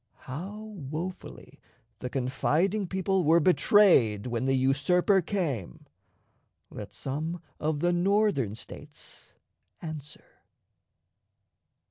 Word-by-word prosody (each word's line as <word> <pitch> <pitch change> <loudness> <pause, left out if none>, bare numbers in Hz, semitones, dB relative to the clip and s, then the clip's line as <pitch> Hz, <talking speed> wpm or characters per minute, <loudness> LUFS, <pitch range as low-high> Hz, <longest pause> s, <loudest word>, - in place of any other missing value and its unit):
How 180 +11 -7 0.3
wofully 175 +5 -7 0.4
the 125 - -4
confiding 160 +10 0
people 190 0 0
were 165 +2 +5
betrayed 170 - +4
when 120 0 -2
the 135 0 +2
usurper 145 +9 +3
came, 145 - -3 0.9
let - - -8
some 155 +6 -4 0.2
of 150 -1 -1
the 175 0 +2
Northern 175 - +1
States - - -12 0.4
answer! 155 -3 -9
160 Hz, 90 wpm, -28 LUFS, 135-185 Hz, 0.9 s, were